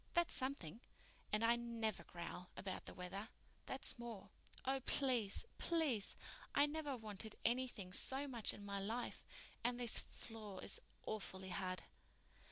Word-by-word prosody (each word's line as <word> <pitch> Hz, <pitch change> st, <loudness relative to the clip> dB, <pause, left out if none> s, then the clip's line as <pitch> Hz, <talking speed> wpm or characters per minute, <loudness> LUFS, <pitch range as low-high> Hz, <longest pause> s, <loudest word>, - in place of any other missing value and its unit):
That's 345 Hz, -1 st, +5 dB
something. 250 Hz, -, 0 dB, 0.5 s
And 215 Hz, +1 st, +3 dB
I 235 Hz, +1 st, +7 dB
never 230 Hz, -3 st, -1 dB
growl 175 Hz, +1 st, -6 dB
about 190 Hz, -2 st, -3 dB
the -, -, -5 dB
weather. 195 Hz, +4 st, -4 dB, 0.4 s
That's -, -, +3 dB
more. 235 Hz, -5 st, -6 dB, 0.3 s
Oh, 270 Hz, +1 st, +3 dB
please, 250 Hz, -, +3 dB
please! 300 Hz, -, +3 dB, 0.4 s
I 285 Hz, -, +8 dB
never 295 Hz, -2 st, -1 dB
wanted 215 Hz, -1 st, -2 dB
anything 235 Hz, -6 st, +1 dB
so 270 Hz, +7 st, +3 dB
much 235 Hz, -5 st, +1 dB
in 205 Hz, -, -7 dB
my 200 Hz, 0 st, -1 dB
life—and 240 Hz, +2 st, -3 dB
this 240 Hz, -2 st, +5 dB
floor 215 Hz, -4 st, -6 dB
is -, -, +2 dB, 0.2 s
awfully 190 Hz, -3 st, -3 dB
hard." 185 Hz, 0 st, -1 dB
225 Hz, 135 wpm, -42 LUFS, 195-255 Hz, 0.5 s, I